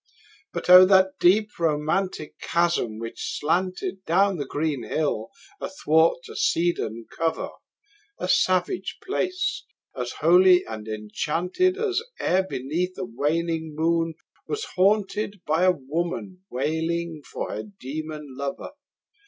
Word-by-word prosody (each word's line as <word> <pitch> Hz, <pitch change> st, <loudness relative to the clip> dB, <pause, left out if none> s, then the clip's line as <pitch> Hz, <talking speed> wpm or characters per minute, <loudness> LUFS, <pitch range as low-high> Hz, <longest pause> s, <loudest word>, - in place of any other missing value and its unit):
But -, -, -5 dB
O, 180 Hz, +1 st, +11 dB
that 190 Hz, 0 st, +4 dB
deep 210 Hz, +3 st, +3 dB
romantic 155 Hz, +1 st, -1 dB
chasm 170 Hz, -10 st, 0 dB
which 115 Hz, +1 st, -5 dB
slanted 185 Hz, +4 st, -1 dB
Down 195 Hz, +3 st, +3 dB
the 140 Hz, -3 st, -4 dB
green 145 Hz, -3 st, -1 dB
hill 115 Hz, -3 st, -1 dB, 0.3 s
athwart 165 Hz, -, +2 dB
a -, -, -10 dB
cedarn 115 Hz, -10 st, 0 dB
cover! 165 Hz, 0 st, -1 dB, 0.7 s
A -, -, -3 dB
savage 185 Hz, +1 st, +1 dB
place! 370 Hz, -1 st, -1 dB, 0.3 s
as 125 Hz, -1 st, -4 dB
holy 180 Hz, +3 st, +5 dB
and 110 Hz, -1 st, -7 dB
enchanted 165 Hz, -, -1 dB
As 425 Hz, -1 st, 0 dB, 0.2 s
e'er 185 Hz, -, +2 dB
beneath 180 Hz, +2 st, -3 dB
a 185 Hz, -, -3 dB
waning 160 Hz, +3 st, -1 dB
moon 165 Hz, +1 st, +1 dB, 0.3 s
was 435 Hz, 0 st, -3 dB
haunted 200 Hz, +2 st, +2 dB
15 205 Hz, -, -21 dB
By 165 Hz, +5 st, +3 dB
woman 175 Hz, +5 st, -3 dB
wailing 160 Hz, +4 st, -2 dB
for -, -, -5 dB
her -, -, -3 dB
demon 155 Hz, -5 st, -7 dB
lover! 140 Hz, -, -5 dB
170 Hz, 120 wpm, -25 LUFS, 150-185 Hz, 0.7 s, O